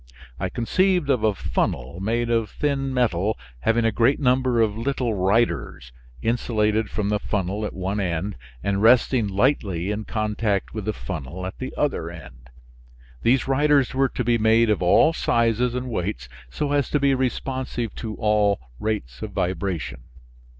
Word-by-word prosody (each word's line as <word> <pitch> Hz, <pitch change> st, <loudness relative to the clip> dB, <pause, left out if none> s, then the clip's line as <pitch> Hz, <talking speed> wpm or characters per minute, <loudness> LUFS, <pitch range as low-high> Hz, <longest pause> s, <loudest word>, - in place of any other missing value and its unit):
I 95 Hz, 0 st, -1 dB
conceived 175 Hz, -, +1 dB
of 125 Hz, -5 st, +1 dB
a 110 Hz, -2 st, +2 dB
funnel 70 Hz, -2 st, -2 dB
made 115 Hz, +4 st, -1 dB
of 115 Hz, -3 st, +1 dB
thin 140 Hz, -2 st, -1 dB
metal 110 Hz, -5 st, +1 dB, 0.2 s
having 115 Hz, -, +2 dB
a 115 Hz, -, +3 dB
great 115 Hz, +7 st, +2 dB
number 130 Hz, -3 st, +2 dB
of 110 Hz, -2 st, +2 dB
little 125 Hz, 0 st, -1 dB
riders, 95 Hz, -, 0 dB, 0.3 s
insulated 110 Hz, -2 st, +1 dB
from 105 Hz, -1 st, -2 dB
the 105 Hz, 0 st, +1 dB
funnel 100 Hz, 0 st, -2 dB
at -, -, -8 dB
one 95 Hz, +2 st, -2 dB
end 95 Hz, +1 st, -2 dB, 0.3 s
and 100 Hz, 0 st, 0 dB
resting 120 Hz, 0 st, +4 dB
lightly 100 Hz, -, 0 dB
in 105 Hz, +1 st, -3 dB
contact 105 Hz, -2 st, -1 dB
with 110 Hz, -3 st, -5 dB
the 110 Hz, -, 0 dB
funnel 85 Hz, 0 st, -6 dB
at 95 Hz, -, -7 dB
the 130 Hz, -, -4 dB
other 135 Hz, -, -1 dB
end. 60 Hz, -8 st, -12 dB, 0.7 s
These 125 Hz, +2 st, +2 dB
riders 140 Hz, -1 st, +3 dB
were 135 Hz, 0 st, +2 dB
to 125 Hz, -, -3 dB
be 120 Hz, 0 st, +2 dB
made 110 Hz, +1 st, +4 dB
of 105 Hz, -, 0 dB
all 90 Hz, -, +5 dB
sizes 115 Hz, -3 st, +1 dB
and 125 Hz, 0 st, -3 dB
weights 100 Hz, -, -3 dB, 0.2 s
so 145 Hz, -, -2 dB
as 145 Hz, -2 st, +1 dB
to 150 Hz, -, +1 dB
be 140 Hz, -1 st, +3 dB
responsive 130 Hz, -2 st, -2 dB
to 110 Hz, -2 st, -5 dB
all 105 Hz, -2 st, +2 dB, 0.2 s
rates 85 Hz, -, -3 dB
of 105 Hz, -2 st, -6 dB
vibration. 90 Hz, -, -2 dB
110 Hz, 165 wpm, -23 LUFS, 95-125 Hz, 0.7 s, all